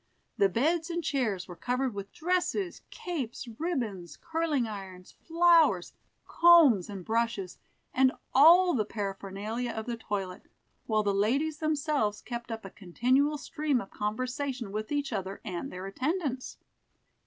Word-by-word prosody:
The 200 - +3
beds 320 - +1
and 340 0 -2
chairs 230 -11 -1
were 175 - -9
covered 250 +4 -1
with 200 0 -7
dresses, 360 +2 -1
capes, 270 -9 -5
ribbons, 235 - -3
curling 325 -6 0
irons, 190 -4 -8
flowers, 330 - +3 0.3
combs, 320 - +6
and 195 -4 -7
brushes, 225 -5 -1 0.3
and 260 0 +4 0.2
all 345 +6 +7
the 225 - +2
paraphernalia 205 +3 -4
of 220 -1 -4
the 235 -1 -3
toilet, 195 -4 -5 0.4
while 215 -1 +2
the 200 -1 +1
ladies 275 +10 +1
themselves 295 -9 0
kept 235 +1 -6
up 225 -2 -6
a 195 - -8
continual 255 - +1
stream 300 -2 -1
of 195 - -8
conversation 250 +2 -3
with 215 +4 -4
each 285 -3 -1
other 195 -1 -4
and 180 -5 -4
their 185 +1 -7
attendants. 265 - -3
240 Hz, 140 wpm, -29 LUFS, 200-305 Hz, 0.4 s, all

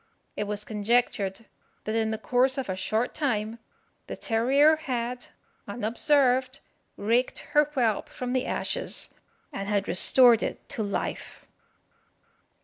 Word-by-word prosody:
It 210 - -2
was 205 0 -3
conjectured 210 -1 -1 0.4
that 215 - -3
in 220 -1 +1
the 220 - -2
course 255 +3 +1
of 265 -6 -3
a 185 - -1
short 215 +5 -1
time 230 -6 -2 0.5
the - - -6
terrier 275 +7 +3
had, 245 -4 -4 0.4
unobserved, 255 +4 +1 0.4
raked 235 +5 0 0.2
her 295 0 +5
whelp 250 -8 -1
from 250 0 -5
the 255 -1 0
ashes, - - -1 0.4
and 195 +1 -5
had 205 -1 0
restored 235 +6 +5
it - - -5
to - - -3
life. 200 -2 -4
235 Hz, 130 wpm, -26 LUFS, 210-260 Hz, 0.5 s, her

